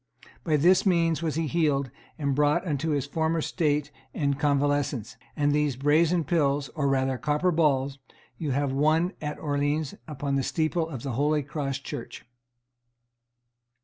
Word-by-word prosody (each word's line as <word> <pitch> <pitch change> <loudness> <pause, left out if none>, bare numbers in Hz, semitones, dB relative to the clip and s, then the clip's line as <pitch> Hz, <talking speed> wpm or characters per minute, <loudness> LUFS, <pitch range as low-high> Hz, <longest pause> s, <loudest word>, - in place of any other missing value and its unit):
By 155 -3 +2
this 175 +5 +4
means 170 -4 +2
was 160 -3 -1
he 165 0 0
healed 145 -5 0 0.3
and 140 -2 0
brought 150 +5 +2
unto 155 -1 -1
his 145 -3 0
former 160 +3 0
state 150 -3 0 0.2
and 140 -1 0
convalescence; 145 -4 0 0.2
and 145 -1 +1
of - - +2
these 150 -3 +1
brazen 160 +5 +3
pills, 145 -3 +1
or 150 -4 -2
rather 130 -1 +1
copper 150 +4 +1
balls, 140 -4 +1 0.4
you 155 - -2
have 140 +1 0
one 155 +6 +2
at 150 -1 -4
Orleans, 145 0 -1
upon 140 -2 -2
the 135 - 0
steeple 160 +3 0
of 130 -7 -7
the 135 - -3
Holy 145 +4 +1
Cross 140 -1 -3
Church. 120 - -7
145 Hz, 155 wpm, -27 LUFS, 140-160 Hz, 0.4 s, this